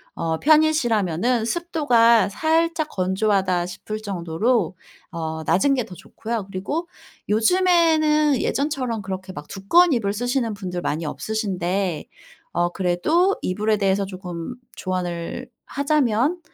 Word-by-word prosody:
어 160 -1 -2
편이시라면은 240 - +2
습도가 235 - +3
살짝 320 - +1
건조 190 +3 -1
하다 185 -3 +1
싶을 215 +4 -6
정도로 190 +1 0 0.4
어 160 -1 -4
낮은 190 - +2
게 250 -3 0
더 180 - -11
좋고요. 225 +3 -5
그리고 285 - -4 0.4
요즘에는 310 - +3
예전처럼 260 -6 -1
그렇게 190 -1 -6
막 145 0 -9
두꺼운 335 - +3
이불 205 -6 0
쓰시는 245 0 -1
분들 180 -3 -5
많이 160 -1 -2
없으신데 190 -3 -2 0.5
어 175 0 +1
그래도 210 - +1
이불에 210 +4 0
대해서 195 -1 +1
조금 180 +2 -7 0.2
조언을 185 +6 -4 0.2
하자면 280 +2 +1
215 Hz, 285 characters per minute, -22 LUFS, 185-280 Hz, 0.5 s, 습도가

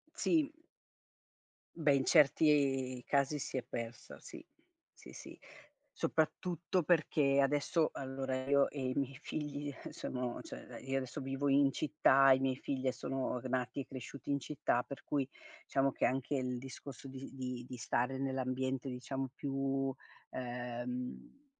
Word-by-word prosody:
Sì. 315 -3 +3 1.3
Beh, 150 -4 +4
in 135 - +1
certi 135 -4 +4
casi 140 +1 +2
si 130 - -3
è 125 - -1
persa, 115 0 -6
sì. - - -10 0.6
Sì, - - -12
sì, - - -10 0.5
soprattutto 170 - 0
perché 150 -4 +3
adesso 145 +3 +3
allora 130 -1 -3
io 140 0 +5
e 145 - -7
i 130 - 0
miei 135 -1 -1
figli, 145 -1 -3
eh, - - -7
sono 125 -1 -3
cioè, - - -9
ehm, - - -11
io 135 - +2
adesso 130 0 -3
vivo 135 +2 -1
in 140 0 +5
città 135 -2 +5
e 130 - +7
i - - -4
miei 130 -1 +1
figlie 130 -1 -1
sono 130 -1 -2
nati 130 +1 -1
e - - -6
cresciuti 135 +2 -6
in 140 - +2
città, 140 -4 0
per 140 +2 -9
cui 140 -2 0 0.4
diciamo 135 0 +2
che - - +1
anche 135 +2 0
il 125 -1 -1
discorso 135 +1 -8
di 135 0 -7
di 125 -2 -4
di 125 - -5
stare 125 +3 0
nell'ambiente 130 0 -1
diciamo 130 +1 -3
più 135 -1 -1 0.4
ehm, 125 - -5
135 Hz, 150 wpm, -35 LUFS, 130-140 Hz, 1.3 s, e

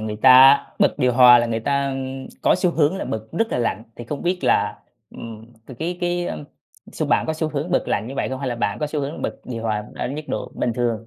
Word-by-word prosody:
người 110 -1 -4
ta 130 +4 +7 0.2
bật - - +3
điều 125 -1 +2
hòa 125 0 +8
là 120 - +1
người 115 -1 -2
ta, 140 +3 0
ưm, 135 0 -5 0.2
có - - +4
xu 180 - +1
hướng 160 +2 +1
là - - -4
bật 110 0 -5
rất 225 +7 0
là - - 0
lạnh, 115 -2 -1
thì 120 - -8
không 145 +4 -6
biết 180 +1 0
là, - - +1 0.3
ừm, 115 -1 -10 0.2
thì 130 - -10
cái 175 +2 -3
cái, 175 0 -1
a, - - -4 0.6
xu - - -3
bạn - - +1
có 160 - 0
xu 160 0 -2
hướng 150 +3 -4
bật 175 - +2
lạnh 105 - -1
như 130 - -7
vậy - - -2
không? 130 - -4
Hay 135 -1 -3
là 120 - -2
bạn 110 -3 -2
có 150 - -1
xu 150 0 -3
hướng 140 +3 -5
bật - - -2
điều 115 -3 -6
hòa 105 -2 -2
ở - - -4
nhiệt 150 +3 -7
độ - - -4
bình 120 - -1
thường? 115 -2 -2
130 Hz, 270 wpm, -21 LUFS, 115-150 Hz, 0.6 s, hòa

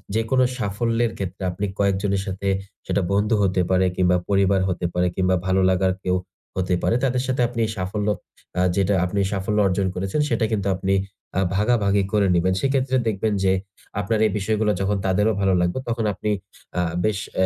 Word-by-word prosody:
যেকোনো 115 +4 +2
সাফল্যের 115 +2 0
ক্ষেত্রে 95 0 -5
আপনি 100 +3 -3
কয়েকজনের 100 0 +1
সাথে, 95 +1 -4 0.4
সেটা 100 - 0
বন্ধু 105 +3 +2
হতে 95 -1 +2
পারে 95 0 +3
কিংবা 90 -1 +3
পরিবার 100 -1 +3
হতে 90 -1 -2
পারে 90 0 +2
কিংবা 95 0 +2
ভালো 95 0 +2
লাগার 95 0 +2
কেউ 90 0 +1 0.4
হতে 90 -1 +1
পারে, - - +2
তাদের 125 0 0
সাথে 130 -1 0
আপনি 120 -1 -6
এই 110 - -3
সাফল্য 100 +3 -2 0.5
আ - - +4
যেটা 100 0 +2
আপনি 90 +3 -1
সাফল্য 100 +1 -1
অর্জন 95 +1 0
করেছেন, 95 +10 -1
সেটা 115 -1 +1
কিন্তু 100 -3 0
আপনি 95 +1 0 0.4
আ - - +4 0.2
ভাগাভাগি 100 -2 +2
করে 105 -2 +3
নিবেন। 95 +2 +2
সেইক্ষেত্রে 135 -1 +1
দেখবেন 110 0 0
যে 95 - +4 0.5
আপনার 110 +2 0
এই - - -2
বিষয়গুলা 105 +1 +1
যখন 100 +1 +1
তাদেরও 105 +4 +2
ভালো 95 -1 +3
লাগবে 90 +7 0
তখন 115 -1 -1
আপনি 100 +3 -3 0.5
আ - - +3 0.2
বেশ 105 -2 +1 0.2
অ্যা 95 - +3
100 Hz, 180 wpm, -23 LUFS, 95-110 Hz, 0.5 s, আ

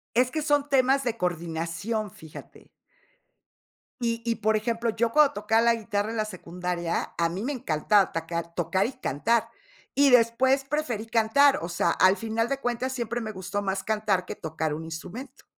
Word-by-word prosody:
Es 250 +1 +3
que 310 +3 -2
son 290 -1 +1
temas 270 0 +3
de 240 -2 -1
coordinación, 175 +4 -3
fíjate. 160 -3 -13 1.3
Y 230 -1 -1
y, 230 -1 0
por 220 +1 +1
ejemplo, 230 +2 -1
yo 230 +1 0
cuando 300 -2 +5
tocaba 220 +2 +2
la 235 0 +4
guitarra 215 -1 -2
en 230 - -4
la 215 - +1
secundaria, 180 -3 -4
a 170 0 +2
mí 180 +4 -5
me 270 +5 -2
encantaba 200 - +2
tocar, 170 +1 -4
tocar 185 +4 +1
y 260 - -5
cantar. 230 - 0 0.5
Y 280 0 +5
después 250 +3 +4
preferí 270 -7 -2
cantar. 230 +5 +4
O 170 - -4
sea, 175 - +1
al 185 +1 +4
final 225 +1 -1
de 275 0 -1
cuentas, 245 +1 -2
siempre 240 -1 -3
me 220 -1 -5
gustó 190 +1 -4
más 195 0 -2
cantar 210 -4 0
que - - -6
tocar 160 -1 -3
un 160 +1 -6
instrumento. 180 - -8
220 Hz, 175 wpm, -26 LUFS, 180-240 Hz, 1.3 s, cuando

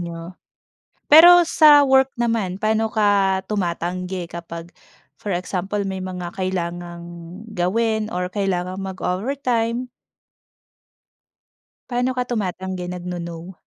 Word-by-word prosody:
niyo. 170 0 -7 0.8
Pero 345 +3 +9
sa 295 -3 +6
work 265 0 +4
naman, 215 -5 -1
pa'no 220 +1 +1
ka 200 -3 +2
tumatanggi 180 -2 -3
kapag 170 0 -8 0.5
for 205 - -5
example 185 +3 -3
may 190 -1 -4
mga 180 -2 -6
kailangang 175 -2 -4 0.5
gawin 220 +4 0
or 180 0 -2
kailangang 185 -1 -2
mag-overtime? 230 +5 -2 2.0
Pa'no 250 +1 0
ka 250 -1 -3
tumatanggi, 190 -4 -3
nag-no-no? 175 0 -7
190 Hz, 95 wpm, -21 LUFS, 180-225 Hz, 2.0 s, Pero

